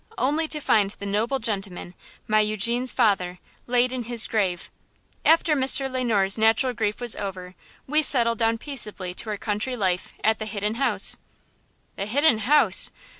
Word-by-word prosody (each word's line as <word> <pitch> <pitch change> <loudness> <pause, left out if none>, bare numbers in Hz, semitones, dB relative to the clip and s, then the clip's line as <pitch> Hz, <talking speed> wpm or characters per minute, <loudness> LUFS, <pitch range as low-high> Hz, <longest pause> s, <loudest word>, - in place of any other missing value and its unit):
only 300 +5 0
to 310 - -2
find 210 -8 +2
the 200 - -8
noble 215 +7 -1
gentleman, 195 -6 -5 0.3
my 215 0 +3
Eugene's 225 +4 +1
father, 190 -7 +1 0.3
laid 245 0 +2
in 250 -2 -4
his 235 -1 +2
grave. 190 -6 -2 0.5
After 320 -1 +4
Mr. 270 0 +2
Le 255 0 -2
Noir's 205 -3 +2
natural 225 +4 +2
grief 210 -2 -2
was 240 -2 +1
over 185 -2 -7 0.3
we 300 +3 +2
settled 235 -6 +2
down 225 0 +1
peaceably 215 -9 -6
to 220 - -7
our 210 - -3
country 210 +5 -2
life 185 -4 -2
at 220 0 +2
the 215 - -5
Hidden 210 0 -3
House–" 265 +4 0 0.8
"The 200 - -3
Hidden 275 +1 +2
House!" 245 -4 +4
225 Hz, 165 wpm, -24 LUFS, 205-255 Hz, 0.8 s, After